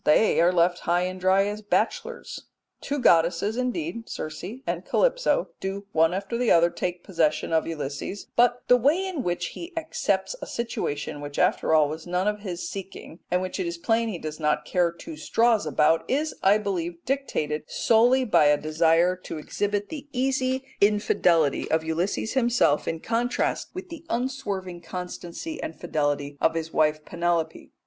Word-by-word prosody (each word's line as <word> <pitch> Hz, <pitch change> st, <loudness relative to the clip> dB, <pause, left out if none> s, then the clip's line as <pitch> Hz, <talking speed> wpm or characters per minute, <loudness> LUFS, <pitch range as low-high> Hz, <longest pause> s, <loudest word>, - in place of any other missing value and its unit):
They 165 Hz, +5 st, +4 dB
are 175 Hz, +1 st, +5 dB
left 175 Hz, 0 st, +2 dB
high 175 Hz, +1 st, +1 dB
and 185 Hz, +1 st, -4 dB
dry 190 Hz, +2 st, +3 dB
as 210 Hz, +1 st, -4 dB
bachelors. 470 Hz, -, -2 dB, 0.4 s
Two 285 Hz, -, -2 dB
goddesses 175 Hz, -, +3 dB
indeed, 250 Hz, 0 st, -3 dB
Circe 155 Hz, +1 st, -6 dB, 0.2 s
and -, -, -2 dB
Calypso, -, -, +1 dB
do 195 Hz, +1 st, -4 dB
one 160 Hz, +1 st, +3 dB
after 200 Hz, +5 st, -3 dB
the 245 Hz, -, +2 dB
other 170 Hz, 0 st, +5 dB
take 180 Hz, -1 st, -4 dB
possession 160 Hz, -4 st, 0 dB
of 160 Hz, -, +2 dB
Ulysses, 150 Hz, +4 st, -5 dB
but 245 Hz, +1 st, +3 dB
the 250 Hz, -, +7 dB
way 295 Hz, +10 st, +2 dB
in 365 Hz, -7 st, -3 dB
which 175 Hz, -4 st, -2 dB
he 340 Hz, +2 st, -8 dB
accepts 330 Hz, +8 st, -1 dB
a -, -, -6 dB
situation 145 Hz, -11 st, -3 dB
which 145 Hz, 0 st, -7 dB
after 160 Hz, -, +2 dB
all 155 Hz, -2 st, +5 dB
was 155 Hz, +3 st, -7 dB
none 180 Hz, +3 st, 0 dB
of 210 Hz, 0 st, 0 dB
his 180 Hz, -4 st, -5 dB
seeking, 190 Hz, -3 st, -8 dB
and 180 Hz, +1 st, +1 dB
which 185 Hz, +1 st, -4 dB
it 185 Hz, -, -1 dB
is 170 Hz, 0 st, -4 dB
plain 225 Hz, +6 st, +1 dB
he 195 Hz, -, -4 dB
does 155 Hz, -1 st, -6 dB
not 150 Hz, -1 st, 0 dB
care 175 Hz, -2 st, +1 dB
two 315 Hz, -, -9 dB
straws 225 Hz, -, +2 dB
about, 150 Hz, +2 st, +3 dB
is, 300 Hz, +4 st, 0 dB
I 200 Hz, +2 st, +5 dB
believe, 175 Hz, -5 st, -4 dB
dictated 155 Hz, -, -2 dB
solely 245 Hz, +3 st, +3 dB
by 175 Hz, -9 st, +4 dB
a 145 Hz, 0 st, +5 dB
desire 165 Hz, +3 st, +3 dB
to -, -, -5 dB
exhibit 205 Hz, +6 st, -2 dB
the 295 Hz, -2 st, -7 dB
easy 260 Hz, 0 st, 0 dB, 0.2 s
infidelity 180 Hz, -7 st, +3 dB
of 160 Hz, 0 st, +1 dB
Ulysses 170 Hz, +7 st, -1 dB
himself 240 Hz, -, +2 dB
in 165 Hz, -1 st, -2 dB
contrast 235 Hz, +2 st, -1 dB
with 370 Hz, 0 st, -7 dB
the 330 Hz, -1 st, -9 dB
unswerving 205 Hz, -8 st, -3 dB
constancy 180 Hz, -, -6 dB
and 160 Hz, -, -5 dB
fidelity 145 Hz, -1 st, -1 dB
of 160 Hz, -, +3 dB
his 165 Hz, 0 st, -3 dB
wife 155 Hz, -1 st, +2 dB
Penelope. 170 Hz, -1 st, -1 dB
185 Hz, 170 wpm, -25 LUFS, 165-235 Hz, 0.4 s, the